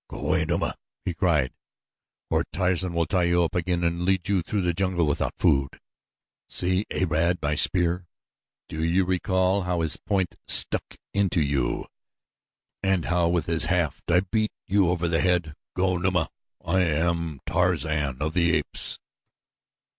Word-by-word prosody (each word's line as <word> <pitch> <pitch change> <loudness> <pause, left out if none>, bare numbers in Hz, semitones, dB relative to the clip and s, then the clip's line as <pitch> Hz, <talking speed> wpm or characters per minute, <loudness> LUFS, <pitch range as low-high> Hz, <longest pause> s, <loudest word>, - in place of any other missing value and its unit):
"Go - - -8
away, - - +1
Numa," - - 0 0.3
he 90 - -1
cried, 80 -8 +1 0.8
"or - - +2
Tarzan 90 +1 0
will 85 0 +2
tie 90 -1 +1
you 85 0 +3
up 85 - -2
again 90 -1 -1
and 85 +1 0
lead 95 -1 +1
you 100 -3 +2
through 100 +4 -2
the 90 -1 +1
jungle 90 -1 0
without 75 -1 -1
food. 70 -1 +1 0.7
See 90 +3 0
Arad, 85 0 +1
my 75 -1 -1
spear! 90 +2 0 0.6
Do 80 0 -4
you 90 +3 +2
recall 95 +1 +1
how 90 -2 -1
his 80 -1 0
point 95 -3 -1
stuck - - +2 0.2
into 100 -3 +1
you 70 -5 0 1.0
and 95 -3 +1
how 90 -1 +2
with 85 -3 0
his 85 -2 +1
haft 85 -6 -1
I 90 +1 +4
beat 110 +3 -1
you 100 -2 +2
over 85 -1 0
the 80 -1 +1
head? 90 -4 +1 0.2
Go, 90 0 +1
Numa! 90 0 +1 0.4
I 95 - +2
am 85 -2 0
Tarzan 75 -3 0
of 80 +1 -2
the 85 -2 +3
Apes!" - - -1
85 Hz, 155 wpm, -25 LUFS, 80-95 Hz, 1.0 s, I